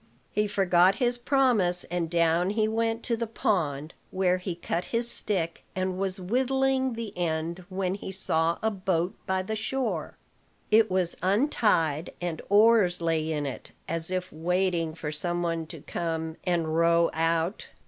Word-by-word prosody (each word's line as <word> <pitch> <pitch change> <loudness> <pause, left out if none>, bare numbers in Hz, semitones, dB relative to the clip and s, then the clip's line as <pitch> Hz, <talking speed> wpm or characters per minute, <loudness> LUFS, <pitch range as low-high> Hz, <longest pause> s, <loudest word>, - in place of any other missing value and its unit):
He 210 0 +1
forgot 190 -2 +3
his 245 -1 0
promise, 240 -10 +3
and 170 -1 -3
down 170 +1 +2
he 215 +1 +1
went 225 +1 -1
to 235 - 0
the 230 0 -3
pond; 165 - -1 0.2
where 185 -1 +1
he 180 -1 -4
cut 170 0 -3
his 235 0 -1
stick, 170 -5 0
and 185 0 -2
was 195 0 +1
whittling 260 +5 +1
the 225 -3 -6
end, 170 +1 -2
when 185 -1 -1
he 195 -1 -6
saw 165 -3 0
a 220 - +2
boat 185 -3 -1
by 190 0 0
the 220 +3 -3
shore. 260 +4 -3 0.5
It 220 0 +5
was 185 -2 +1
untied, 185 - +1
and 175 -3 -4
oars 205 -3 +5
lay 160 -1 0
in 150 -2 -2
it, 135 - -7
as 165 0 +1
if 185 0 -3
waiting 170 0 0
for 150 -2 -5
some 175 +3 -2
one 165 -1 -2
to 160 -2 -9
come 160 -1 -3
and 165 -3 0
row 170 0 +3
out. 165 +3 0
180 Hz, 160 wpm, -27 LUFS, 165-210 Hz, 0.5 s, It